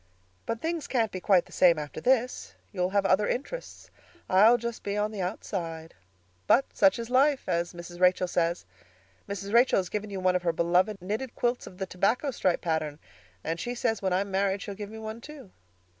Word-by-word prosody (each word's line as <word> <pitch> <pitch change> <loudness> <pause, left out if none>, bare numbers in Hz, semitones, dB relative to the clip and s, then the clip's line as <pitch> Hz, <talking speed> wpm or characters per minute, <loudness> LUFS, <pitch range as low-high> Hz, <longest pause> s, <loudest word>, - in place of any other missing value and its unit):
But 230 0 -3
things 330 -1 -2
can't 230 -5 0
be 185 - -5
quite 185 -2 +3
the - - -19
same 175 -3 +5
after 150 -1 -6
this. 250 -1 0 0.2
You'll 180 -2 -1
have 200 0 +1
other 195 +2 +3
interests. - - -5 0.4
I'll 215 +6 +6
just 235 -1 -5
be 200 0 -3
on 210 +1 0
the 205 -3 -5
outside. 170 -4 -4 0.5
But 270 - +5
'such 195 -2 +4
is 235 +1 -6
life' 275 +2 +3
as 170 +1 -1
Mrs. 175 0 -9
Rachel 180 0 +4
says. 170 0 0 0.6
Mrs. 200 +1 -5
Rachel 240 +2 +5
has 185 -2 -1
given 210 0 -4
you 195 -1 -5
one 185 0 +2
of 180 - +1
her 170 -1 0
beloved 180 +5 +2
knitted 220 +6 -4
quilts 245 0 -1
of 180 - -12
the 190 - -3
'tobacco 210 +11 0
stripe' 185 -8 0
pattern, 155 -3 -2 0.5
and 165 +1 -3
she 245 +6 -3
says 225 -2 -1
when 190 -1 0
I 180 +1 +2
am 200 0 -5
married 195 0 0
she'll 205 - -6
give 205 0 -7
me 220 - -9
one, 220 +1 -7
too." 280 -8 -11
200 Hz, 205 wpm, -28 LUFS, 180-230 Hz, 0.6 s, I'll